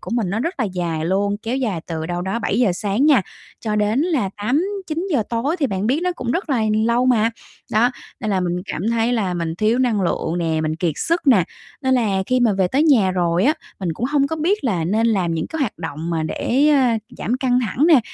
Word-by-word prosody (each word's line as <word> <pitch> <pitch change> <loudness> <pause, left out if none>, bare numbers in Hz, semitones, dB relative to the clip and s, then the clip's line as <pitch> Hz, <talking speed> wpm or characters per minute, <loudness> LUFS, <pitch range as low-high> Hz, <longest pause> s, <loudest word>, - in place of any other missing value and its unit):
của - - -8
mình 215 -7 0
nó 220 - -1
rất 335 +9 -2
là 250 - +1
dài 175 -5 -2
luôn, 200 +2 +1
kéo 235 +4 -2
dài 215 -11 -1
từ 160 -1 -4
đâu 175 0 -3
đó 190 +5 -2
7:00 235 -4 +1
sáng 205 +9 0
nha, 270 -9 +5 0.4
cho 215 -2 -2
đến 210 +4 +1
là 295 - 0
8-9 335 - -2
giờ 255 - +2
tối 265 +9 0
thì 280 - +2
bạn 195 -1 -2
biết 275 +7 +1
nó 360 - 0
cũng 250 -8 -4
rất 345 +1 -2
là 245 -4 +2 0.2
lâu 240 +2 +2
mà. 230 -3 +3 0.4
Đó, 230 +3 +4 0.3
nên 215 -3 -2
là 190 - +1
mình 180 0 -2
cảm 195 +8 -3
thấy 230 +1 +1
là 200 -7 0
mình 165 -2 -2
thiếu 215 +7 +1
năng 235 -6 +2
lượng 175 -1 -1
nè, 160 -2 0
mình 155 0 -1
kiệt 165 -1 0
sức 335 -1 -1
nè, 210 -11 +5 0.4
nên 260 -1 +2
là 200 -6 +1
khi 255 0 +1
mà 230 -4 +4
về 190 -2 +1
tới 275 +9 +2
nhà 245 -12 +4
rồi 175 0 +1
á, 300 - +4 0.3
mình 175 -3 -1
cũng 230 +10 -2
hông 280 0 +2
có 320 +3 -3
biết 350 +1 0
là 185 -9 0
nên 215 +7 +1
làm 185 -7 +1
những 160 - -2
cái 320 - -5
hoạt 245 -10 -2
động 160 0 -5
mà 165 -2 -1
để, 265 - +1
ơ, 300 - +5 0.4
giảm 245 +4 -1
căng 250 -2 +1
thẳng 250 - +1
nè, 310 -7 +6
225 Hz, 245 wpm, -20 LUFS, 180-260 Hz, 0.4 s, nè